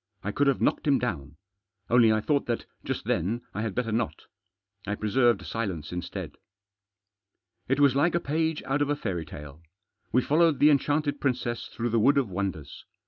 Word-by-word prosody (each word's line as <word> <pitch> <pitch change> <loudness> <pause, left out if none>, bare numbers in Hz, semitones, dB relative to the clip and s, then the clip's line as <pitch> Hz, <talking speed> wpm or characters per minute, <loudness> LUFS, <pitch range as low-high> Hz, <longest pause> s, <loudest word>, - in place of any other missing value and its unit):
I 105 - -2
could 140 +7 +1
have 140 - +2
knocked - - +1
him 140 -2 +5
down. 80 - -4 0.5
Only 115 -2 +5
I 110 0 +2
thought 140 +5 0
that, 120 -1 -2 0.2
just - - -4
then, 110 +8 0
I 105 - -3
had 110 -3 -3
better 120 -3 -1
not. 115 +1 -2 0.6
I 105 - -1
preserved 120 +3 +2
silence 95 -10 -4
instead. 90 -1 -6 1.3
It 135 +2 +1
was 140 -2 +5
like 160 +5 +2
a - - +3
page 160 +1 -1
out 135 +2 -1
of 145 - +1
a 145 - +2
fairy 90 - -4
tale; 75 +1 -10 0.5
we 125 +2 +3
followed 160 0 +3
the 150 +3 +6
enchanted 145 0 +1
princess 125 -3 -1
through 120 +1 -3
the 115 0 +2
wood 140 +6 +4
of 130 -6 +1
wonders. 90 -6 -4
120 Hz, 185 wpm, -27 LUFS, 105-145 Hz, 1.3 s, the